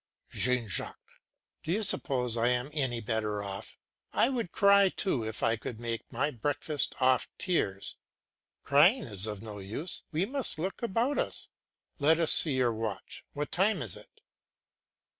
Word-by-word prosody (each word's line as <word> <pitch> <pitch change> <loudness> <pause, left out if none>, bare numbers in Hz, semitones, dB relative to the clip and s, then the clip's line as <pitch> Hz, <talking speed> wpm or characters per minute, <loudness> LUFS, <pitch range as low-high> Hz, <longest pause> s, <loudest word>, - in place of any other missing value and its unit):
JEAN 125 -2 +2
JACQUES. 100 - -5 0.5
Do 160 - -4
you 215 +5 +1
suppose 125 - +4
I 115 +1 +2
am 125 +3 0
any 130 -6 -1
better 105 -2 -1
off? 100 +1 -6 0.3
I 240 - +3
would 235 -9 -3
cry 200 -1 +5
too 180 - -1
if 110 0 -5
I 115 0 +3
could 110 0 -7
make 115 -1 -4
my 150 - 0
breakfast 145 +4 -2
off 130 -1 +3
tears. 100 - -1 0.7
Crying 170 - +5
is 105 -4 -4
no 105 0 -6
use, 110 - -5
we 165 +4 0
must 270 - -3
look 185 +8 -4
about 235 +5 0
us. - - -3 0.5
Let 155 +3 +4
us 165 - +3
see 155 - +6
your 125 -3 +2
watch; 110 -3 -5
what 145 0 -4
time 195 - +1
is 105 -7 -3
it? - - -15
130 Hz, 160 wpm, -30 LUFS, 110-175 Hz, 0.7 s, see